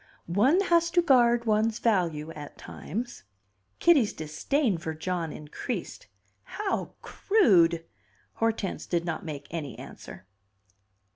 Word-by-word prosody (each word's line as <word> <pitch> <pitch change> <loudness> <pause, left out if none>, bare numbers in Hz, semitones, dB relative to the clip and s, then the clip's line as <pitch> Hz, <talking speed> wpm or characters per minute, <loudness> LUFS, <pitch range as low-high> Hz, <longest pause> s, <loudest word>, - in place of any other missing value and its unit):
"One 245 - +3
has 340 -3 +3
to - - +8
guard 240 -6 +4
one's 220 0 +2
value 165 -8 0
at 150 -2 -10
times." 240 +4 -6 0.6
Kitty's 285 -11 +4
disdain 180 - -1
for 160 -1 -4
John 165 0 -3
increased. 150 - -6 0.3
"How 415 -2 -3
crude!" 175 - +3 0.5
Hortense 225 -4 -1
did 170 -1 -1
not 165 -2 -3
make 150 -4 -6
any 155 -5 -5
answer. - - -11
200 Hz, 115 wpm, -27 LUFS, 165-250 Hz, 0.6 s, to